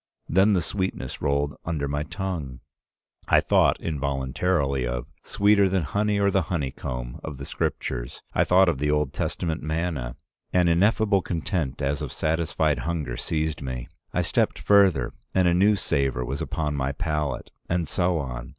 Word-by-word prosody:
Then 95 Hz, +4 st, +4 dB
the 90 Hz, -3 st, +2 dB
sweetness 95 Hz, -1 st, -3 dB
rolled 70 Hz, +1 st, +1 dB
under 75 Hz, -4 st, -2 dB
my 75 Hz, +1 st, -1 dB
tongue. 80 Hz, -6 st, -4 dB, 0.7 s
I -, -, +6 dB
thought -, -, +3 dB
involuntarily 70 Hz, 0 st, 0 dB
of -, -, -3 dB, 0.2 s
'Sweeter 100 Hz, -1 st, +3 dB
than 95 Hz, -2 st, +1 dB
honey 105 Hz, +5 st, 0 dB
or 100 Hz, 0 st, +3 dB
the 95 Hz, -, +3 dB
honeycomb' 65 Hz, -6 st, -3 dB
of 75 Hz, -3 st, -6 dB
the 70 Hz, -, -7 dB
Scripture. -, -, -2 dB, 0.3 s
I -, -, +3 dB
thought 95 Hz, +1 st, +5 dB
of 85 Hz, -6 st, +1 dB
the 75 Hz, +1 st, 0 dB
Old 75 Hz, -2 st, +1 dB
Testament 80 Hz, -5 st, -2 dB
manna. 80 Hz, -5 st, -2 dB, 0.4 s
An 90 Hz, -1 st, +3 dB
ineffable 100 Hz, +3 st, +3 dB
content 80 Hz, -, -2 dB
as 70 Hz, +1 st, 0 dB
of -, -, -4 dB
satisfied 80 Hz, -1 st, 0 dB
hunger 80 Hz, -8 st, -2 dB
seized 75 Hz, +4 st, -2 dB
me. 65 Hz, -3 st, -5 dB, 0.2 s
I -, -, 0 dB
stepped -, -, +1 dB
further, 95 Hz, -12 st, +4 dB, 0.2 s
and 95 Hz, -1 st, +4 dB
a 85 Hz, -, +4 dB
new 100 Hz, +4 st, +4 dB
savor 70 Hz, -9 st, 0 dB
was 70 Hz, +3 st, -4 dB
upon 75 Hz, -2 st, -2 dB
my 70 Hz, -1 st, -1 dB
palate. 75 Hz, -4 st, -2 dB, 0.2 s
And 85 Hz, -2 st, 0 dB
so 90 Hz, +3 st, +1 dB
on. 65 Hz, -4 st, -5 dB
80 Hz, 160 wpm, -25 LUFS, 70-90 Hz, 0.7 s, I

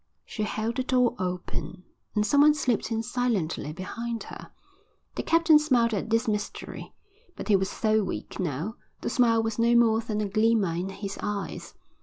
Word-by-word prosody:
She 215 Hz, -, -6 dB
held 215 Hz, +3 st, -2 dB
the 260 Hz, -, +1 dB
door 250 Hz, -2 st, +2 dB
open 180 Hz, -1 st, -4 dB, 0.3 s
and 210 Hz, 0 st, +2 dB
some 285 Hz, +7 st, +4 dB
one 300 Hz, 0 st, +6 dB
slipped 245 Hz, -6 st, 0 dB
in 225 Hz, 0 st, -1 dB
silently 225 Hz, -, -1 dB
behind 225 Hz, +7 st, -5 dB
her. -, -, -10 dB, 0.6 s
The -, -, -3 dB
captain 330 Hz, -2 st, +5 dB
smiled 245 Hz, -6 st, +2 dB
at 210 Hz, +2 st, -2 dB
this 225 Hz, +1 st, +1 dB
mystery, 210 Hz, -1 st, -4 dB, 0.4 s
but -, -, -7 dB
he 205 Hz, -, +6 dB
was 190 Hz, 0 st, +1 dB
so 220 Hz, -1 st, +1 dB
weak 190 Hz, -, -5 dB
now, 175 Hz, -, -3 dB, 0.2 s
the -, -, -2 dB
smile 230 Hz, -2 st, +3 dB
was 225 Hz, 0 st, -3 dB
no 235 Hz, +1 st, +4 dB
more 225 Hz, -2 st, +5 dB
than 220 Hz, -2 st, -3 dB
a 210 Hz, -, 0 dB
glimmer 215 Hz, -3 st, +2 dB
in 180 Hz, +3 st, -3 dB
his 195 Hz, 0 st, -6 dB
eyes. 200 Hz, -6 st, -4 dB
220 Hz, 180 wpm, -27 LUFS, 195-235 Hz, 0.6 s, one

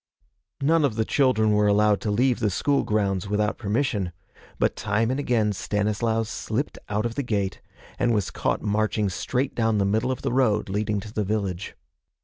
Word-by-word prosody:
None 160 Hz, +2 st, +4 dB
of 135 Hz, -6 st, +1 dB
the 110 Hz, 0 st, 0 dB
children 125 Hz, -6 st, +3 dB
were 105 Hz, 0 st, +3 dB
allowed 105 Hz, 0 st, +3 dB
to 110 Hz, -, -2 dB
leave 120 Hz, +4 st, +2 dB
the 110 Hz, -3 st, +1 dB
school 140 Hz, +9 st, +1 dB
grounds 100 Hz, -3 st, 0 dB
without 105 Hz, +1 st, 0 dB
permission, 105 Hz, -4 st, -1 dB, 0.5 s
but -, -, +1 dB
time 110 Hz, +4 st, 0 dB
and 130 Hz, -, -1 dB
again 115 Hz, -6 st, +1 dB
Stanislaus 105 Hz, +3 st, -1 dB
slipped 115 Hz, +5 st, -3 dB
out 105 Hz, +2 st, 0 dB
of 115 Hz, -, -2 dB
the 140 Hz, -, -2 dB
gate, 100 Hz, -6 st, -2 dB, 0.4 s
and 120 Hz, -, +2 dB
was 105 Hz, -4 st, 0 dB
caught -, -, -1 dB
marching 105 Hz, -1 st, +1 dB
straight 130 Hz, +8 st, -2 dB
down 115 Hz, -2 st, +1 dB
the 100 Hz, -, +2 dB
middle 110 Hz, +6 st, +1 dB
of 130 Hz, -, -5 dB
the -, -, -1 dB
road 110 Hz, -6 st, +2 dB
leading 105 Hz, +1 st, -1 dB
to 105 Hz, 0 st, -10 dB
the 105 Hz, -, 0 dB
village. 100 Hz, -2 st, -3 dB
105 Hz, 185 wpm, -25 LUFS, 105-120 Hz, 0.5 s, None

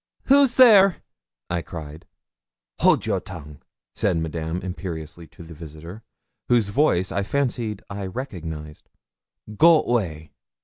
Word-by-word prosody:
'Who's 275 Hz, -2 st, +4 dB
there?' 205 Hz, -7 st, +7 dB, 0.6 s
I 85 Hz, -1 st, -1 dB
cried. 80 Hz, -2 st, -9 dB, 0.7 s
'Hold -, -, +4 dB
a -, -, -6 dB
your -, -, 0 dB
tongue,' 75 Hz, -5 st, -11 dB, 0.3 s
said 85 Hz, -, 0 dB
Madame 80 Hz, +1 st, -3 dB
imperiously 85 Hz, -3 st, -7 dB
to 85 Hz, -, -14 dB
the 85 Hz, 0 st, -11 dB
visitor, 80 Hz, +5 st, -10 dB, 0.5 s
whose 115 Hz, -4 st, +3 dB
voice 100 Hz, -, +1 dB
I 100 Hz, -, -1 dB
fancied 115 Hz, -3 st, -2 dB
I 100 Hz, -1 st, -6 dB
recognised 80 Hz, -, -7 dB, 0.7 s
'go 165 Hz, +4 st, +6 dB
way.' 85 Hz, -10 st, -2 dB
90 Hz, 125 wpm, -23 LUFS, 80-120 Hz, 0.7 s, there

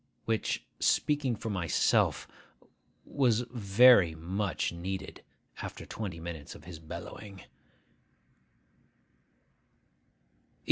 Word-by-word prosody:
which, 110 Hz, -1 st, -1 dB
speaking 145 Hz, -5 st, +2 dB
for 110 Hz, +1 st, -5 dB
myself, 90 Hz, -5 st, +2 dB, 0.8 s
was 125 Hz, -5 st, +2 dB
very 105 Hz, -5 st, +6 dB
much 90 Hz, +3 st, -2 dB
needed 95 Hz, +3 st, -6 dB, 0.4 s
after -, -, -7 dB
twenty 95 Hz, -7 st, -5 dB
minutes 80 Hz, -3 st, -7 dB
of -, -, -13 dB
his 85 Hz, -1 st, -9 dB
bellowing. 95 Hz, +4 st, -9 dB
95 Hz, 80 wpm, -30 LUFS, 85-115 Hz, 0.8 s, very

